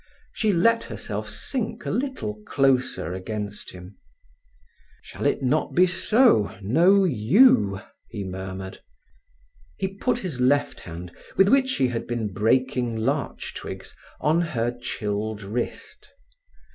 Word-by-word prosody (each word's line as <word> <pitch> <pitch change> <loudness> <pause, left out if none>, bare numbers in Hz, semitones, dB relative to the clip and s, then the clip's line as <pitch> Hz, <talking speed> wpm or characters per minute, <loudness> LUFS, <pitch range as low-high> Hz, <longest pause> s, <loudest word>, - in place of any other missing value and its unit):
She 215 -2 +1
let 230 +6 +3
herself - - -5
sink 240 -5 -3
a - - -1
little 220 - -3
closer 130 - +1
against 105 +2 -5
him. 90 +1 -12 1.1
"Shall - - -3
it - - 0
not 145 +5 0
be 180 - +6
so—no 180 - +3
yew?" 110 - +4 0.3
he 100 - -5
murmured. 95 0 -6 1.0
He 190 - -1
put 225 +5 -1
his 175 - -5
left 145 +3 +2
hand, 85 +1 -9 0.2
with 195 +1 +6
which 265 +1 +3
he 130 - +2
had 115 -1 -4
been 115 -4 -3
breaking 125 +2 +1
larch 135 +6 -2
twigs, - - -8 0.2
on 160 +3 +2
her 120 -7 -1
chilled 105 -3 -3
wrist. 110 +5 -5
125 Hz, 120 wpm, -24 LUFS, -, 1.1 s, be